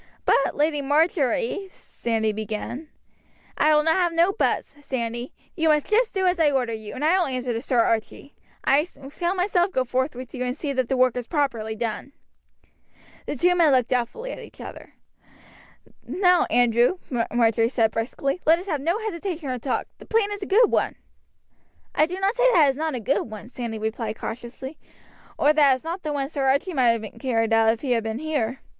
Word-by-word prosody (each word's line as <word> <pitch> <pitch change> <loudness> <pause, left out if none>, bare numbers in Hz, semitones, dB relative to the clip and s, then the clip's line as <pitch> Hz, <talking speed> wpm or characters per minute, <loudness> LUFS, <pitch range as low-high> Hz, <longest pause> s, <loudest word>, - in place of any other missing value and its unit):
"But, 275 - +2
Lady 295 0 +1
Marjory 320 - +1
" - - -24
Sandy 220 -2 -2
began. 220 +7 -5 0.7
"I 305 0 +4
will 300 0 +3
have 345 +2 +3
no 340 +4 +3
buts, 390 - -1
Sandy; 240 -2 -4 0.2
you 320 -2 +1
must 300 -1 +3
just 450 +1 +1
do 380 -1 +1
as 360 -1 +2
I 315 -2 +5
order 255 -4 0
you, 220 -1 -7
and 290 - -2
I 360 +4 +4
will 355 - +1
answer 255 -2 -2
to 230 - -3
Sir 255 -2 0
Archie. 230 +5 -2 0.3
I 285 +2 +4 0.3
shall 350 +4 -1
myself 360 0 +1
go 260 - +1
forth 255 +2 -1
with 255 0 -9
you 250 - -3
and 250 +2 -3
see 290 -3 -3
that 260 -2 -1
the 265 - +1
work 255 -1 +3
is 245 -1 -4
properly 235 -8 -1
done." 230 +4 -4 1.1
The - - -2
two 355 +6 +3
men 335 -4 +4
looked 255 -3 +2
doubtfully 255 - -2
at - - -7
each - - -13
other. - - -10 1.1
"Now, 360 -2 +3
Andrew," 240 +7 +3 0.3
Marjory 230 -1 +3
said 225 -3 +2
briskly, 275 +8 -2
"let 320 +2 +5
us 360 - -8
have 305 -8 -2
no 340 +7 +1
hesitation 340 -6 -4
or 250 - -3
talk, 255 +2 -2
the - - -13
plan 445 -2 +1
is 410 0 -5
a 390 - -4
good 435 +3 +4
one." - - +1 1.0
"I 305 - +3
do 365 +2 -5
not 390 +2 +1
say - - +3
that 325 -5 +6
it - - +4
is - - -9
not 310 0 -2
a - - -3
good 235 +2 -1
one," 215 +2 -9
Sandy 235 -3 -5
replied 220 0 -3
cautiously, 250 +5 -7 0.6
"or 295 - +4
that 290 -3 +5
it - - +2
is 255 - -10
not 340 +3 -5
one 295 -3 -1
that 270 - -6
Sir 275 -3 -1
Archie 280 +8 +1
might 240 -5 +3
have 215 - -9
carried 225 -4 0
out 225 0 +5
if 230 - -9
he 270 - -2
had 235 -2 +2
been 220 0 -3
here." 270 -4 -2
275 Hz, 210 wpm, -24 LUFS, 235-335 Hz, 1.1 s, that